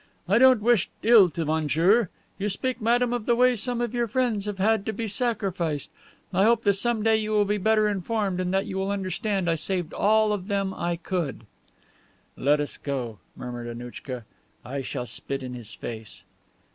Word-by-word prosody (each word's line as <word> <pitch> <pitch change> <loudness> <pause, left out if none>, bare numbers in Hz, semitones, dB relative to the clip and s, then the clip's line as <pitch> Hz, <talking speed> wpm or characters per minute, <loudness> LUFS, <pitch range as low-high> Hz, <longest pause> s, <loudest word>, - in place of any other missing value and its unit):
"I 200 +5 +4
don't 255 -4 +6
wish 235 -5 +3
ill 220 -5 +7
to 165 +1 -3
monsieur. 160 +7 +2 0.3
You 205 +2 -1
speak, 255 +5 -3
madame, 240 +2 +2
of 240 -3 -3
the 240 - +4
way 250 +1 +4
some 240 +2 -1
of 240 -1 -2
your 240 -1 0
friends 230 -3 0
have 205 -2 -3
had 215 +1 +2
to 220 - -1
be 225 +2 -3
sacrificed. 195 - -2 0.4
I 190 +2 +3
hope 230 +1 +3
that 200 - +4
some 220 +2 0
day 220 0 +4
you 215 0 -2
will 210 -1 +3
be 205 +1 0
better 215 +1 +3
informed, 200 -1 -1
and 180 0 -1
that 195 +1 +1
you 190 - -4
will 195 +1 -1
understand 195 0 -1
I 165 - +3
saved 175 +1 -3
all 215 0 +3
of 195 -2 -4
them 195 -2 -1
I 175 -1 -2
could." 170 - -3 0.9
"Let 145 +3 +2
us 145 - -3
go," 125 -7 -4 0.2
muttered 120 -1 -6
Annouchka. 120 0 -7 0.4
"I 135 +3 -4
shall 125 -1 -4
spit 135 +2 -5
in 125 -1 -6
his 120 -3 -7
face." 110 -2 -8
195 Hz, 195 wpm, -26 LUFS, 160-220 Hz, 0.9 s, ill